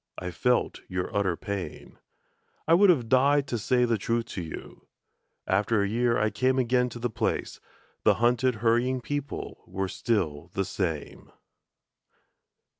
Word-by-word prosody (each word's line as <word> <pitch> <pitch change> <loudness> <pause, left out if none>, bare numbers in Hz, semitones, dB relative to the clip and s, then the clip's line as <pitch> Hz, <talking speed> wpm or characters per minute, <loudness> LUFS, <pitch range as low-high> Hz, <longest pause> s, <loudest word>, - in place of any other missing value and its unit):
I 90 0 -4
felt 125 +8 0
your 90 0 -4
utter 95 -4 +1
pain. 100 -3 -6 0.7
I 165 - +5
would 195 +3 +6
have 130 -10 +3
died 140 +4 +4
to 120 - -1
say 125 +4 +2
the 115 -3 0
truth 115 +4 0
to 95 - -3
you. 80 -2 -9 0.6
After 100 +2 +2
a - - 0
year 120 +3 +1
I 105 0 +1
came 130 +5 +1
again 125 0 +2
to 120 - -8
the 120 +1 -1
place - - -2 0.4
The - - +4
hunted 120 +1 +2
hurrying 125 +3 +2
people 145 +2 -5
were 95 +1 -2
still 85 - -1
the 95 - 0
same.... 80 -7 -4
115 Hz, 150 wpm, -27 LUFS, 95-125 Hz, 0.7 s, would